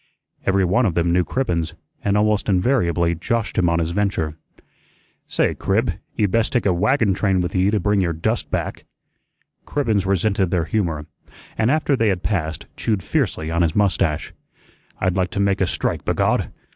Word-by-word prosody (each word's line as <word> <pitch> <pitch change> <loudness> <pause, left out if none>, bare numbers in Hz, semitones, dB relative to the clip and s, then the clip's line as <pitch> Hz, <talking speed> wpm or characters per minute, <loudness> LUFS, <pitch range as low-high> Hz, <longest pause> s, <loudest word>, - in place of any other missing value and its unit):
Everyone 95 +5 +3
of 85 - -2
them 85 0 +2
knew 90 0 +3
Cribbens, 85 -9 -2 0.3
and 100 0 +2
almost 105 -1 +1
invariably 90 -5 +2
joshed 110 +7 -1
him 85 - +3
on 85 - +1
his 85 0 -1
venture. 85 -5 -1 0.9
"Say, - - +1
Crib, 100 -1 0 0.2
ye'd 105 -4 +1
best 115 -1 +1
take 125 - +1
a 95 - +3
wagon 105 +3 +2
train 95 0 +1
with 90 -1 -2
ye 95 +1 +2
to 105 0 +1
bring 105 +1 +2
your 85 -2 +1
dust 80 0 -2
back." - - -3 0.8
Cribbens 110 -9 0
resented 100 -1 +1
their 85 -2 0
humor, 85 -7 -1 0.5
and 110 +1 +1
after 150 -1 +2
they 115 -3 +1
had 95 -3 0
passed, 80 -6 -2
chewed 105 -5 -1
fiercely 80 +1 -1
on 85 +1 +1
his 80 -2 +1
mustache. 85 -6 +1 0.7
"I'd 95 -1 0
like 95 0 +1
to 100 - -4
make 100 -1 +1
a 95 - +3
strike, - - -2
b'God! - - +1
95 Hz, 175 wpm, -21 LUFS, 85-105 Hz, 0.9 s, Everyone